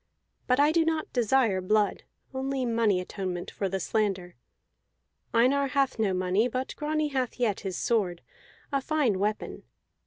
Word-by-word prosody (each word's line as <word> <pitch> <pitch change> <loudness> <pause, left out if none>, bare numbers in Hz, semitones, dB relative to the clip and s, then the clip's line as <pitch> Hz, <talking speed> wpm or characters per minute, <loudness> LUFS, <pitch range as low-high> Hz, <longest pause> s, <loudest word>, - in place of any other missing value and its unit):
But 250 +1 +3
I 295 +2 +5
do 330 0 +3
not 320 -1 -1
desire 235 -5 +2
blood, 210 +2 +1 0.3
only 265 0 -2
money 230 -5 +2
atonement 180 -1 -4
for 195 - -2
the 195 +1 -2
slander. 190 -3 -1 1.0
Einar 270 +4 +3
hath 270 -2 0
no 210 -3 +2
money; 185 +5 +1
but 255 +2 -4
Grani 305 0 -1
hath 260 -3 -2
yet 220 -5 +1
his 190 -3 -4
sword, 190 -7 0 0.5
a 275 -1 +1
fine 265 -10 +1
weapon. 210 +2 -2
230 Hz, 150 wpm, -28 LUFS, 195-270 Hz, 1.0 s, I